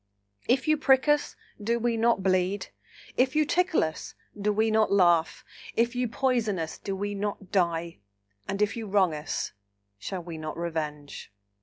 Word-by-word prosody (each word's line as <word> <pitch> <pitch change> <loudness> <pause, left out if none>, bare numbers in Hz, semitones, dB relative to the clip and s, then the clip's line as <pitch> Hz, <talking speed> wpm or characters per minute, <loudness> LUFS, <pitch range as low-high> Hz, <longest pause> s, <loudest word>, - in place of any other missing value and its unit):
If 255 +3 +2
you 310 0 +4
prick 270 -2 +4
us, 295 0 +2 0.3
do 230 +3 +1
we 235 0 0
not 230 -3 +2
bleed? 185 +1 +1 0.5
If 260 +2 +2
you 305 0 +4
tickle 360 +2 +2
us, 160 -1 -5 0.2
do 210 +1 0
we 220 +1 +2
not 215 -1 +3
laugh? 175 -4 +3 0.3
If 235 +1 +2
you 250 0 0
poison 235 -4 0
us, 160 -1 -4
do 195 - -4
we 205 +1 -3
not 200 -1 -4
die? 170 - 0 0.5
and 195 +2 0
if 210 - -1
you 225 -2 -5
wrong 190 -4 +3
us, 150 0 -3 0.5
shall 180 - -5
we 165 -2 -7
not 155 0 -5
revenge?" 155 - -5
205 Hz, 170 wpm, -27 LUFS, 170-235 Hz, 0.5 s, you